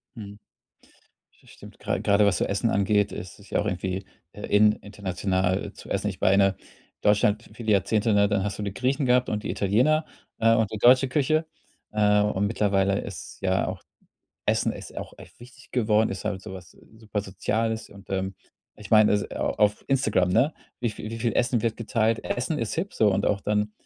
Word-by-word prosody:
Mhm. 105 -2 -9 1.0
Das - - -20
stimmt, - - -14
gra - - -2
grade 100 +1 +3
was 100 -3 +2
so - - +1
Essen 100 +3 0
angeht, 100 +1 +2
ist 90 -1 -8
es 100 -1 -17
ja - - +1
auch - - -3
irgendwie 95 0 -3 0.3
in 105 +1 +3
international 95 -1 -2
zu - - -12
essen. 100 +1 -1
Ich 95 - -7
meine, 95 0 +4 0.5
Deutschland, 105 +1 +2
viele 110 -3 -1
Jahrzehnte 105 +2 +2
ne, 100 0 +5
dann 100 -2 0
hast 100 0 -3
du - - -4
die 100 -1 -3
Griechen 130 +6 0
gehabt 125 0 +3
und 105 -1 -2
die - - -4
Italiener, 130 +11 +2 0.3
äh, 115 0 +4
und 110 -2 +1
die 110 - -4
deutsche 130 +4 +5
Küche. 155 +3 +1 0.5
Äh, 105 -1 +3
und 100 -1 0
mittlerweile 100 -2 +1
ist - - -8
ja - - +1
auch - - -6 0.6
Essen - - +1
ist - - -10
auch - - -6
echt - - -15
wichtig 125 +3 -16
geworden, 110 -3 +2
ist 95 - -6
halt 105 -3 -2
so - - -8
was 90 -1 -11 0.3
super 110 -2 -3
Soziales 110 +3 -2
und, 100 -1 -15
ähm, 95 0 -2 0.4
ich 105 -2 -12
meine, 110 -1 +6
es 105 0 0
au - - -1
auf 105 0 +1
Instagram, 110 -9 +2
ne, 125 - +2 0.3
wie 120 - 0
vie 110 +1 -8
wie 115 - -5
viel 115 0 -1
Essen 120 -1 +2
wird 115 0 -1
geteilt? 115 -1 0
Essen 140 +6 -2
ist 115 -4 -2
hip, 185 +5 -3
so 105 -2 +3
und 95 +1 0
auch 100 -2 0
dann 105 0 0
105 Hz, 200 wpm, -25 LUFS, 100-115 Hz, 1.0 s, meine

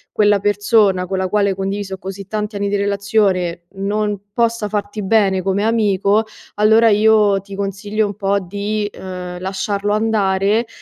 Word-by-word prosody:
quella 205 -1 +4
persona 205 -2 +2
con 190 0 -2
la 190 - 0
quale 200 +1 +1
hai 190 - -1
condiviso 195 0 -4
così 195 +1 -7
tanti 210 +1 -4
anni 200 0 -1
di 205 - 0
relazione 200 -4 0
non 205 +1 -1 0.2
possa 230 -3 0
farti 205 0 -3
bene 195 -2 +2
come 195 +2 0
amico, 210 -1 +2 0.3
allora 220 +2 +4
io 210 -2 +4
ti 195 0 -12
consiglio 200 +2 -2
un 205 - -5
po' 200 -1 0
di, 205 +3 -3
uhm, 180 -1 -7
lasciarlo 200 +2 -2
andare 210 0 +1
200 Hz, 155 wpm, -18 LUFS, 195-210 Hz, 0.3 s, quella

